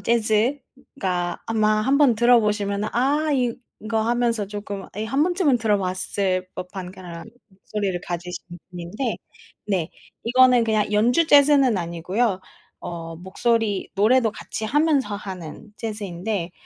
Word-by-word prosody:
재즈가 220 -4 -1
아마 215 -1 +2
한번 275 -1 +4
들어 240 +1 +5
보시면은 210 -1 -1
'아 290 +5 +2
이거.' 235 -3 -2
하면서 235 -2 0
조금 205 -1 -6
이 215 - -2
1 270 +6 +1
번쯤은 350 -7 +2
들어 215 -3 +2
봤을 185 0 -1
법한 180 0 -7
그러한 180 0 -9 0.2
목소리를 190 -1 -3
가지신 175 0 -5 0.3
분인데 180 +8 -4 0.5
네. 185 -5 -1 0.3
이거는 250 +1 +5
그냥 215 -2 +1
연주 245 +10 +3
재즈는 280 -5 +5
아니고요. 185 +5 -1 0.4
어 165 -1 -6
목소리 205 +3 -1
노래도 225 +3 +3
같이 220 - -6
하면서 280 -4 +1
하는 190 0 -8
재즈인데, 200 -3 -4
215 Hz, 275 characters per minute, -23 LUFS, 185-245 Hz, 0.5 s, 들어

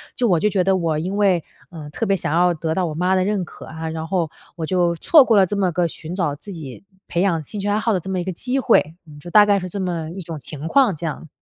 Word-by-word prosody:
就 245 -3 +1
我 170 -3 +3
就 210 - +2
觉 190 -3 +1
得 190 0 +2
我 165 -3 0
因 190 +5 -3
为， 190 -5 +3 0.3
嗯， 150 -3 -9
特 225 - -2
别 195 -1 +2
想 150 - -2
要 175 +1 +3
得 160 0 -2
到 185 0 0
我 155 - -4
妈 180 +3 +1
的 185 0 +2
认 205 -3 0
可 - - -12
啊， 160 0 -6
然 160 0 -5
后 170 -4 -1 0.2
我 165 -2 -4
就 175 -1 +1
错 295 - +6
过 225 - +3
了 190 - +6
这 205 +3 -3
么 185 -3 +1
个 175 -1 +1
寻 165 +2 -7
找 170 -7 0
自 195 +7 -10
己 150 -1 -9 0.3
培 170 - -1
养 170 -5 +1
兴 205 +8 -7
趣 205 - -3
爱 205 - +2
好 225 0 0
的 185 - +1
这 190 - -8
么 185 -1 -1
一 - - -2
个 190 - -3
机 255 +9 -1
会， 170 - +2 0.3
就 175 - -9
大 210 +2 +7
概 200 -1 +3
是 185 - -5
这 200 - -5
么 170 -3 -3
一 190 +1 -7
种 160 -2 -7
情 150 +4 -6
况， 255 -10 +4
这 165 +2 -7
样。 160 0 -5
180 Hz, 315 characters per minute, -21 LUFS, 160-195 Hz, 0.3 s, 大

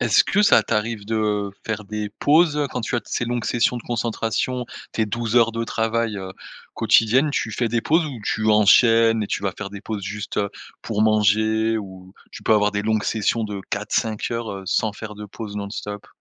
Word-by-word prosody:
Est-ce - - +4
que 205 +2 +1
ça - - +6
t'arrive 110 -1 -2
de 105 -2 -1 0.2
faire 110 -1 -3
des 105 0 -4
pauses 150 -1 +3
quand 125 - -3
tu 120 - -3
as 120 - +1
ces 120 - -2
longues 120 -1 -2
sessions 120 +1 +1
de 120 - -6
concentration? 120 +2 -2 0.3
Tes 110 - +1
12 115 +1 -3
heures 115 -1 +5
de 115 0 -2
travail, 115 -1 -1
heu, 95 -1 -6 0.4
quotidiennes 130 +7 +3
tu 115 - -1
fais 115 +2 -1
des 115 +1 0
pauses 160 +1 +2
où 130 -6 -7
tu 110 0 -1
enchaînes 115 +1 +5
et - - -2
tu - - -3
vas 100 -2 -1
faire 100 -1 -6
des 100 -1 -8
pauses 105 -3 -5
juste, 100 +2 -5
heu, 100 -1 +1 0.3
pour 105 -1 -1
manger 110 +1 +2
ou, 95 -2 -10 0.2
tu - - -10
peux - - +3
avoir 105 0 +3
des 100 0 -2
longues 110 -1 +1
sessions 110 +1 0
de 100 -2 -5
4-5 105 +2 -1
heures, 115 -1 -3
heu, 95 -1 -7
sans 110 +2 +1
faire 105 0 -8
de 105 0 -8
pause 105 0 -8
non-stop? 105 0 -6
110 Hz, 205 wpm, -22 LUFS, 105-115 Hz, 0.4 s, ça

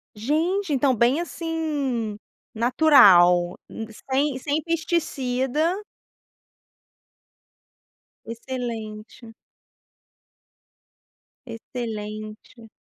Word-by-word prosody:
Gente, 315 - -1
então 270 -1 +2
bem, 240 +6 +2
assim, 295 -10 -3 0.4
natural 195 - +5 0.5
sem 275 0 +1
sem 290 +3 -1
pesticida 315 -2 -1 2.5
Excelente. 230 -2 -7 2.1
Excelente. 215 -1 -7
250 Hz, 45 wpm, -24 LUFS, 220-305 Hz, 2.5 s, natural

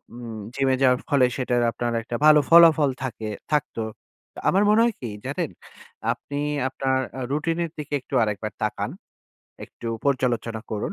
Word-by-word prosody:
উম 115 -2 -7 0.2
জিমে 135 -1 +2
যাওয়ার 125 -1 +4
ফলে 140 -4 +4
সেটার 125 -2 +1
আপনার 120 0 -2
একটা 120 - -5
ভালো 155 0 +8
ফলাফল 165 -3 +7
থাকে 115 -4 -4 0.2
থাকতো। 145 -5 0 0.7
আমার 195 +2 +3
মনে 215 +2 +5
হয় 235 -2 +1
কি 120 - -4 0.2
জানেন? - - -2 0.6
আপনি 145 0 -7 0.3
আপনার 130 0 0 0.2
আ - - -4
রুটিনের 165 +3 -1
দিকে 150 -1 -6
একটু 130 - -15
আরেকবার 105 0 -3
তাকান। 105 0 -2 0.7
একটু 120 - -11 0.2
পর্যালোচনা 120 -4 0
করুন। 105 - -2
130 Hz, 150 wpm, -24 LUFS, 120-150 Hz, 0.7 s, ভালো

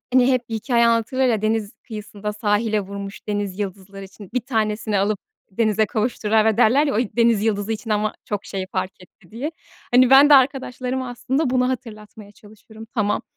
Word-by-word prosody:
hani, 255 0 +5
hep 250 -1 -1
bir 225 - -4
hikâye 235 +1 +2
anlatırlar 235 +3 +1
ya, 225 -4 +1
deniz 215 -1 -1
kıyısında 210 -2 -6
sahile 210 0 0
vurmuş 200 0 -8
denizyıldızları 195 -1 -4
için 195 0 -13
bir 250 - +1
tanesini 215 -3 -1
alıp 200 +1 0 0.3
denize 215 +1 +1
kavuşturana 220 -1 +1
derler 245 +6 +4
ya, 280 - -1
o - - +1
denizyıldızı 225 -2 +1
için 225 +1 -6
ama 210 0 0
çok 205 -1 -4
şey 190 -1 -5
fark 185 0 -3
etti 180 0 -21
diye. 255 +8 -4 0.4
Hani, 250 +1 +5
ben 275 +2 +8
de - - +10
arkadaşlarıma 260 -1 +1
aslında, 260 +4 -1
bunu 250 0 +2
hatırlatmaya 215 -4 -7
çalışırım. 220 +1 -15
Tamam, 210 -4 0
220 Hz, 165 wpm, -21 LUFS, 205-245 Hz, 0.4 s, de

